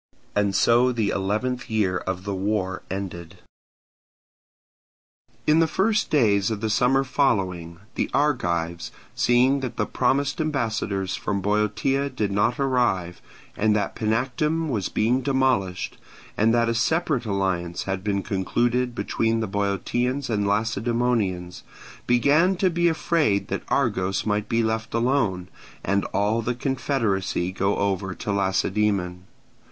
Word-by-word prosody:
And 100 -1 +1
so 120 +6 +4
the 110 -4 0
eleventh 110 +7 -2
year 105 -5 +1
of 95 -1 -4
the 100 0 -3
war 95 -1 -1
ended. 90 -2 -6 2.1
In 155 +1 +4
the 165 - +4
first 215 +6 +1
days 105 -8 +3
of 110 -2 -3
the 110 0 -1
summer 135 +4 +3
following, 95 - 0 0.2
the - - -1
Argives, 85 - 0 0.2
seeing 125 +3 +3
that 125 -3 -5
the - - +1
promised 140 +5 0
ambassadors 110 -10 -1
from 100 -1 -2
Boeotia 105 +7 0
did 110 -6 -2
not 105 +6 +1
arrive, 120 -10 0 0.3
and 105 0 +2
that 100 -2 -1
Panactum 130 +8 0
was 105 -8 -1
being 120 +4 +1
demolished, 130 -9 0 0.4
and 110 +2 +3
that 115 0 +2
a 115 - +1
separate 140 -1 0
alliance 95 -4 -1
had 95 -1 -3
been 100 -2 -1
concluded 120 +6 0
between 115 -1 0
the 110 - -1
Boeotians 120 +7 -1
and 105 -2 0
Lacedaemonians, 110 -3 0 0.5
began 145 +10 +3
to 185 0 +1
be 170 +1 +2
afraid 160 -10 +1
that - - -2
Argos 95 +1 0
might 105 -1 -1
be 115 0 +2
left 110 0 -2
alone, 115 -7 +1 0.4
and 100 +1 0
all 105 +3 0
the 120 +2 -2
confederacy 115 -9 -1
go 100 +2 0
over 95 -1 -1
to 105 - -4
Lacedaemon. 95 -1 0
110 Hz, 135 wpm, -24 LUFS, 95-125 Hz, 2.1 s, so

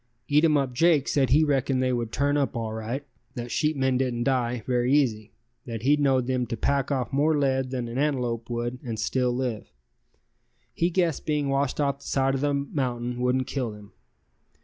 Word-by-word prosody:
Eatumup 145 -3 +3
Jake 155 0 +3
said 135 -3 +2
he 150 +4 +5
reckoned 135 -3 +1
they 130 0 +1
would 120 -2 -2
turn 140 +3 +1
up 140 -1 0
all 110 -1 -3
right, 115 +6 -4 0.3
that 120 0 -5
sheepmen 135 -4 +1
didn't 125 -2 0
die 125 -3 0
very 125 0 +1
easy, 115 -7 +1 0.4
that 115 -2 -5
he 145 +3 +5
knowed 135 -4 +2
them 125 -1 -1
to 115 0 -4
pack 140 +3 0
off 135 -1 -2
more 150 +3 +3
lead 135 -2 +1
than 125 -2 -3
an 120 +3 -4
antelope 125 -6 -1
would 120 +1 -3
and 115 -3 -4
still 125 -1 0
live; 120 -3 -3 1.0
he 170 - +1
guessed 170 -5 0
being 150 -2 0
washed 135 0 0
off 140 -1 0
the - - -15
side 135 0 +1
of 135 - -1
the 145 0 +1
mountain 125 -4 -2
wouldn't 125 +1 +1
kill 130 -3 -2
them. 105 -1 -12
130 Hz, 190 wpm, -26 LUFS, 120-140 Hz, 1.0 s, he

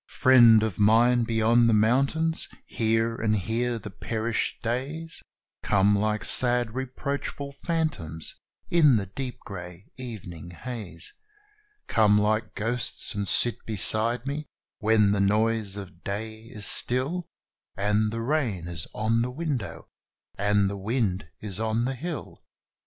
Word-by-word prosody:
Friend 120 -4 +6
of 105 -4 -3
mine 115 +3 +4
beyond 115 +1 +3
the 110 - +4
mountains, 140 +9 +1 0.2
here 115 0 0
and 110 -1 +1
here 115 +5 -1
the 105 -2 -8
perished 115 +2 -2
days 140 +8 -3 0.4
Come 100 0 +3
like 105 +1 0
sad 120 -3 +4
reproachful 140 +2 -4
phantoms, 140 - -3 0.3
in 150 -7 +5
the 100 -3 0
deep 125 +6 -6
grey 90 -1 -10
evening 90 -10 -8
haze 90 -1 -7 0.7
Come 105 -2 +3
like 105 +1 0
ghosts, 115 +3 -2
and 100 -1 -3
sit 120 +3 +2
beside 110 +3 +3
me 145 +1 -4 0.3
when 110 -2 +3
the 100 -1 +1
noise 105 0 +1
of 95 -3 -10
day 110 +2 -5
is 110 -4 -2
still, 140 - +3 0.5
And 105 +2 +1
the 115 +1 -4
rain 115 - -1
is 85 -2 -5
on 110 +2 +1
the 120 - -1
window, 135 -6 -4 0.5
and 100 0 +2
the 100 +1 -4
wind 100 -4 -2
is 105 -2 -4
on 110 +1 0
the 135 - -1
hill. 155 +4 -7
110 Hz, 135 wpm, -26 LUFS, 105-125 Hz, 0.7 s, Friend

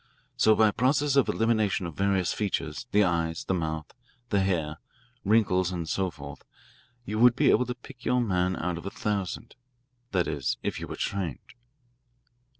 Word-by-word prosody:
So 110 - +5
by 110 0 +5
a - - -4
process 140 +5 +2
of 140 - +4
elimination 110 -4 +1
of 85 - -5
various 95 -1 +1
features, 100 -1 -3
the 105 +1 +5
eyes, 85 -3 -1
the - - 0
mouth, 80 -3 -3 0.4
the 100 - +2
hair, 80 -6 -1 0.4
wrinkles, 95 -4 +3
and 85 -3 -4
so 95 +4 0
forth, 70 -4 -10 0.6
you 110 +1 -3
would 120 0 +6
be - - +4
able 125 - +3
to 125 - -3
pick 125 0 -14
your 125 - +2
man 95 -5 +1
out 85 +1 -2
of - - -12
a - - -1
thousand 105 +2 -3 0.6
that 90 -3 +1
is, 70 -5 -1
if - - -2
you - - -6
were - - -6
trained." 95 - -4
95 Hz, 175 wpm, -27 LUFS, 85-110 Hz, 0.6 s, would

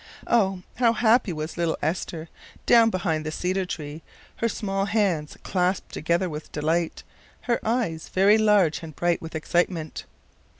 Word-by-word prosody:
Oh! 195 -5 +2
How 235 -2 +4
happy 230 -2 +3
was 155 +1 -5
little 170 -2 0
Esther, 160 0 -3 0.4
down 230 -1 +6
behind 175 -6 -1
the 155 - -4
cedar 185 +3 -1
tree, 150 -2 -6 0.4
her 230 - 0
small 195 -2 -2
hands 195 -8 0
clasped 180 0 -1
together 170 +4 0
with 155 -2 -7
delight, 160 +3 -1 0.4
her 240 -1 0
eyes 220 -9 -1
very 200 +3 +4
large 205 -7 +3
and 160 -3 -9
bright 175 -1 0
with 165 0 -8
excitement. 165 0 -1
180 Hz, 145 wpm, -25 LUFS, 160-205 Hz, 0.4 s, down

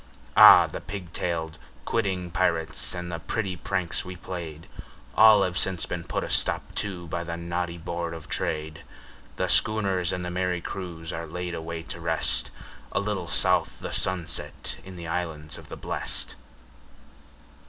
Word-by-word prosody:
Ah! - - +11
the - - -6
pig 90 -4 -7
tailed, 80 -3 -2 0.3
quidding 95 -6 0
pirates 85 -1 0
and 90 0 -4
the 85 - -3
pretty 95 +2 -2
pranks 90 0 -1
we 90 0 -7
played, 85 -3 -6 0.5
All 110 -2 +9
have 90 -1 0
since 95 -2 0
been 85 -1 -4
put - - -1
a - - -3
stop - - 0
to 95 -4 -4
by 85 +2 -2
the 85 0 -4
naughty 85 0 -2
Board 85 0 -3
of 80 - -9
Trade; 80 +1 -2 0.5
The - - 0
schooners 95 -5 +2
and 90 -1 -2
the 90 - -3
merry 90 0 0
crews 85 -3 -5
are 85 0 -4
laid 90 0 -4
away 80 0 -4
to 85 - -6
rest, 80 -1 -1 0.4
A - - +1
little 100 -3 -1
south - - +2
the - - -5
sunset 90 -3 -2
in 95 -1 -9
the 85 -1 -7
Islands 80 -3 -3
of - - -14
the - - -6
Blest. - - -4
85 Hz, 165 wpm, -27 LUFS, 85-95 Hz, 0.5 s, Ah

